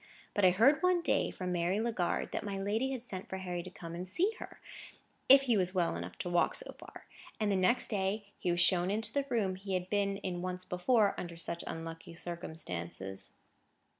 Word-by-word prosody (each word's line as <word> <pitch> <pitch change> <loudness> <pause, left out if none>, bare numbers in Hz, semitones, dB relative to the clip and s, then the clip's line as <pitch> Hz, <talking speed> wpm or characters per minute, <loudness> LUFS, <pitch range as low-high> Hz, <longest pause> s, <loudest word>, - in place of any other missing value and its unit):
But 205 - 0
I 185 - +8
heard 250 - +5
one 365 -1 +3
day, - - +2
from 180 -1 -4
Mary 175 +2 +1
Legard, 220 -6 -1
that - - -3
my 200 -2 -3
lady 210 +7 0
had 260 -3 -4
sent 190 -6 -6
for 190 - -3
Harry 180 -2 -3
to 185 - -8
come 170 -2 -9
and 180 +2 -5
see 370 - +3
her, - - -9 0.7
if 270 +1 +10
he 245 -4 +2
was 185 -1 +1
well 175 - +1
enough 85 +1 -6
to 180 - -3
walk 175 - +3
so - - -4
far; - - -12 0.3
and 210 -2 +1
the - - +2
next 185 +6 +2
day 200 0 -1
he - - -1
was 175 0 +2
shown 180 0 +4
into 215 +3 -1
the 280 -1 0
room 200 -6 0
he 190 0 -3
had 180 0 -3
been 200 -1 +1
in 180 -3 -4
once 185 0 -4
before 205 +3 +3
under 170 -1 -6
such 170 0 -1
unlucky 165 +1 -7
circumstances. 95 - -5
185 Hz, 210 wpm, -33 LUFS, 175-215 Hz, 0.7 s, if